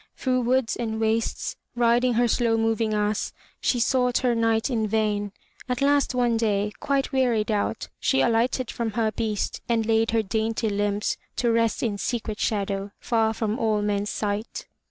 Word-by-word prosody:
Through 255 -1 0
woods 250 0 +1
and 220 -2 -3
wastes, 225 0 -1 0.2
riding 240 +1 +3
her 240 +1 +3
slow 230 -1 +2
moving 225 0 +1
ass, 210 0 -1 0.3
she 245 - +1
sought 250 +1 +2
her 245 - +3
knight 225 -1 +1
in 225 -5 0
vain. 210 -1 0 0.4
At 250 -1 -1
last 285 -2 +2
one 240 -2 +2
day, 210 -2 0
quite 275 0 0
wearied 240 -5 +1
out, 205 -1 -1
she 270 - +2
alighted 240 +2 +1
from 230 -3 -3
her 220 -1 +1
beast 215 -1 -2
and 230 -2 +2
laid 225 0 +2
her 225 -1 +2
dainty 220 +2 -1
limbs 205 0 0 0.2
to 240 -1 +1
rest 230 -1 +1
in 210 -4 -1
secret 220 -2 -3
shadow, 200 -1 -1
far 225 -2 +1
from 220 +2 -2
all 215 -3 +1
men's 205 0 -1
sight. 210 +1 -3
225 Hz, 170 wpm, -25 LUFS, 215-240 Hz, 0.4 s, riding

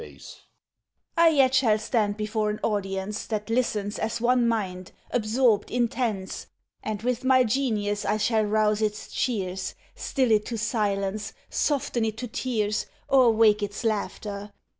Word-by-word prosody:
MAID - - -8
(ignoring - - -16
interruption) - - -12 0.7
I 335 0 +6
yet 275 -5 +4
shall 240 -5 +4
stand 215 -1 0
before 215 0 -1
an 210 - -3
audience 195 -1 -2
That 215 0 -3
listens 215 -4 0
as 220 +1 -2
one 240 0 +3
mind, 185 -5 -2 0.2
absorbed, 225 -1 +2
intense, 230 -5 -2 0.3
And 215 0 -4
with 250 +1 -1
my 260 -1 +5
genius 215 -4 0
I 210 - +1
shall 220 +1 +2
rouse 215 0 +1
its 215 0 -2
cheers, 190 -6 -2 0.2
Still 260 -4 0
it 210 -1 +3
to 235 - -3
silence, 210 -2 -1 0.2
soften 270 -5 0
it 220 -1 -2
to 245 +1 -4
tears, 215 -3 -1 0.2
Or 260 -3 +6
wake 220 -2 +4
its 205 +3 -4
laughter. 205 -2 -3
215 Hz, 155 wpm, -26 LUFS, 205-240 Hz, 0.7 s, I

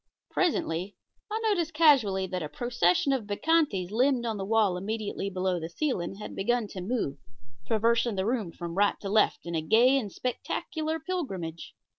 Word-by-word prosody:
Presently 195 - 0 0.3
I 435 +1 -1
noticed 345 -8 0
casually 250 - +4
that 185 -1 -4
a 150 - -4
procession 240 - +1
of 240 -6 -2
bacchantes 205 - +1
limned 250 +2 +2
on 225 -2 -2
the 195 - -3
wall 210 -3 +3
immediately 205 +1 -3
below 185 -1 -1
the 165 0 -5
ceiling 195 - -2
had 210 - -8
begun 240 +3 +1
to 185 - -6
move, 180 - -2 0.5
traversing 230 0 +2
the 190 0 -1
room 220 -6 -1
from 170 0 -6
right 205 - +3
to 195 - -4
left 210 -3 +2
in 170 - -5
a 160 - 0
gay 240 - +5
and 210 -6 -5
spectacular 315 - -3
pilgrimage. 195 - -5
215 Hz, 170 wpm, -28 LUFS, 185-260 Hz, 0.5 s, gay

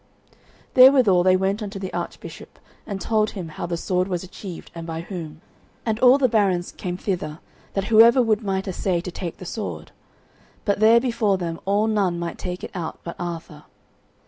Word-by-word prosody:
Therewithal 255 -8 +7
they 185 +1 +4
went 195 +3 -1
unto 205 -1 -5
the 190 -1 -6
Archbishop - - -7 0.3
and 200 -3 -4
told 215 0 +1
him 180 -5 -7
how 160 - -5
the 170 0 -2
sword 180 +2 0
was 180 -2 -3
achieved, 185 -1 -9
and 165 0 -7
by 165 0 -4
whom. 165 -4 -7 0.4
And 220 -1 -1
all 255 +2 +7
the 270 -2 +3
barons 195 -6 +1
came 180 -2 -5
thither, 175 -6 -3 0.4
that 195 - 0
whoever 230 +3 +7
would 225 -3 +2
might 195 -2 -2
assay 185 -1 -1
to 180 - -6
take 170 -1 -6
the 185 - -10
sword. 215 +4 -6 0.7
But 200 -1 +1
there 225 +2 +6
before 235 -5 +1
them 170 -2 -4
all 200 +2 +2
none 200 -5 +1
might 170 -1 -5
take 180 0 -5
it - - -6
out 170 -4 -5
but 170 - -6
Arthur. 165 -3 -6
190 Hz, 185 wpm, -23 LUFS, 175-215 Hz, 0.7 s, Therewithal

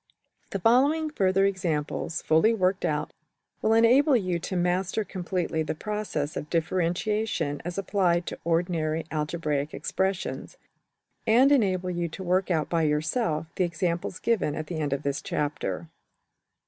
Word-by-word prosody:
} - - -42
The - - -2
following 280 - +3
further 195 -5 +2
examples, 170 -4 -2
fully 160 +9 +4
worked 185 -1 +1
out, 150 -1 -1 0.5
will 220 - +3
enable 255 +5 +5
you 185 -5 -1
to 185 - -4
master 180 +4 0
completely 180 -3 -2
the 155 - -2
process 210 -7 -3
of 150 - -5
differentiation 175 -1 0
as 175 +1 -5
applied 180 -3 +1
to - - -6
ordinary 165 -2 0
algebraical 150 -2 -2
expressions, 190 - -2 0.7
and 250 +5 +5
enable 190 -9 +2
you 175 -1 -1
to 190 +4 -7
work 185 +2 +1
out 160 -4 +1
by 170 -1 +1
yourself 155 +2 0
the - - +3
examples 170 +1 -2
given 220 -10 0
at 155 - -4
the 160 0 -5
end 145 -2 -1
of 140 +1 -1
this 140 0 -1
chapter. 150 +2 -3
175 Hz, 145 wpm, -27 LUFS, 160-200 Hz, 0.7 s, enable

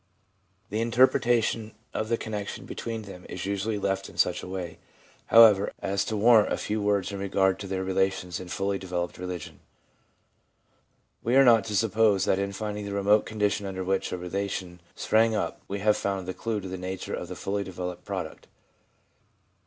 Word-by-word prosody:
The 110 +2 0
interpretation 115 -2 +2 0.2
of 110 - -2
the 115 - +2
connection 105 -3 -5
between 115 -1 -5
them 95 -3 -10
is - - -5
usually 100 +2 -1
left 95 -1 -1
in - - -15
such - - +2
a - - -8
way, 90 -3 -5 0.5
however, 110 -3 +7
as 100 0 -1
to 110 - -2
warrant 110 0 +5
a - - +1
few 105 0 -2
words 100 -2 +1
in 100 - -5
regard 95 -1 +1
to 100 - -6
their 95 0 -2
relations 95 -2 0
in 95 - -8
fully 95 +2 -1
developed 90 -2 -4
religion. 90 -2 -6 1.6
We 120 +3 +1
are 135 0 +7
not 115 -5 +6
to 105 - -3
suppose 105 -2 +3
that 95 - +2
in 100 0 -1
finding 105 0 -4
the 100 - -5
remote 100 +1 +3
conditions 105 -1 0
under 95 -1 -4
which 95 +1 -1
a - - -2
relation 90 -1 -4
sprang 110 0 +3
up 105 - -2
we 100 - -3
have 105 0 +4
found 95 -2 -2
the 95 - -3
clue 110 0 -3
to 95 - -7
the 95 0 -5
nature 95 0 -5
of - - -4
the - - -7
fully 100 +1 -2
developed 90 -1 -6
product. - - -6
100 Hz, 185 wpm, -27 LUFS, 95-110 Hz, 1.6 s, however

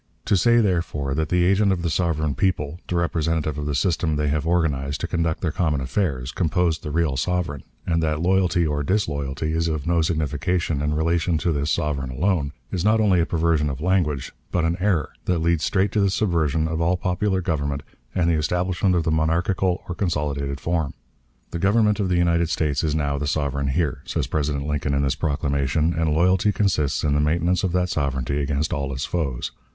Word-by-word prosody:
To - - +2
say, 120 +5 +4
therefore, 85 -8 -1
that 80 +1 -1
the 90 0 +2
agent 100 +2 +3
of 90 -3 -1
the 85 - 0
sovereign 80 -3 0
people, 75 +1 -1
the 90 - -2
representative 80 -3 0
of 75 - -3
the 75 - -1
system 80 0 +1
they 75 0 0
have 75 +2 -1
organized 75 -5 0
to - - -1
conduct 85 -2 -1
their 85 - 0
common 80 -5 0
affairs, 65 -2 -1
composed 85 -1 0
the - - -5
real 80 -2 0
sovereign, 85 -1 -1 0.2
and 85 -2 +1
that 75 -1 0
loyalty 90 -1 +2
or 75 -1 -1
disloyalty 75 -5 -1
is 80 +1 0
of 80 -3 -2 0.2
signification 80 0 -1
in 75 +1 0
relation 85 +1 +1
to 85 - 0
this 75 0 -1
sovereign 75 -5 -1
alone, 75 +2 0 0.2
is 90 -2 -2
not 110 +2 +3
only 100 -5 +3
a 85 - +1
perversion 80 -3 +1
of 70 -1 -4
language, 75 -6 0 0.2
but 85 -2 +1
an 85 +1 +1
error, 90 -6 +1
that 90 - +1
leads 85 -1 +1
straight 95 +1 +1
to 110 - 0
the 100 - +3
subversion 80 -6 +1
of 80 0 -2
all 85 +2 +2
popular 95 +2 0
government 70 -5 -2 0.3
and 85 -2 +2
the 85 - +3
establishment 90 +4 +1
of 85 - +1
the 80 - 0
monarchical 85 +4 +1
or 90 - -3
consolidated 75 -6 -2
form. 80 -1 -1 0.6
The 85 - -3
Government 105 +2 +3
of 95 -2 0
the 90 - +2
United 85 -1 +2
States 75 -2 0
is 75 -1 0
now 70 -2 -1
the 75 - -2
sovereign 70 -1 -1
here, 75 +1 -1
says - - -1
President 70 -2 -1
Lincoln 75 -1 -1
in 70 - +1
this 70 -1 +1
proclamation, 75 +1 0
and 80 -2 0
loyalty 90 +6 +3
consists 90 -9 0
in 75 -2 +2
the 75 - +2
maintenance 85 +4 +1
of 95 - +1
that 90 0 +1
sovereignty 70 -2 -1
against 75 +4 -1
all 70 -4 -2
its 65 +1 -3
foes. 70 -8 -2
80 Hz, 200 wpm, -23 LUFS, 75-90 Hz, 0.6 s, say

